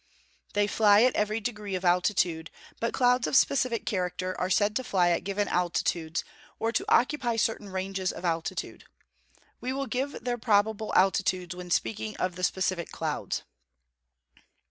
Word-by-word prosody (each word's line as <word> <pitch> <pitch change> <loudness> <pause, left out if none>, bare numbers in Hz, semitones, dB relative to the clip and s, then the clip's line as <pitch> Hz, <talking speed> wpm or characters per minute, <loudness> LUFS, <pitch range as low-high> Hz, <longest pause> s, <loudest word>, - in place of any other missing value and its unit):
_ - - -26
They 205 0 +3
fly 205 +1 +5
at 255 - +3
every 210 +1 0
degree 210 -3 -4
of 185 0 -4
altitude; 175 -2 +2 0.3
but 230 - 0
clouds 250 -1 +3
of - - -1
specific 255 -3 +2
character 185 -1 -2
are 180 - 0
said 205 +3 +2
to 260 - -3
fly 180 -6 +2
at 170 - 0
given 200 +1 -1
altitudes, 170 -2 -1 0.3
or 225 - -1
to - - 0
occupy 250 -2 +2
certain 220 -2 -1
ranges 190 0 -2
of 180 - -8
altitude. 165 -1 -3 0.7
We 255 +2 -3
will 275 +1 -2
give 270 +2 -3
their 245 -1 -2
probable 220 -1 +1
altitudes 185 -2 +2
when 180 0 -8
speaking 215 +4 -1
of 185 -1 -1
the 185 - -7
specific 185 -2 0
clouds. - - -3
205 Hz, 160 wpm, -28 LUFS, 180-225 Hz, 0.7 s, fly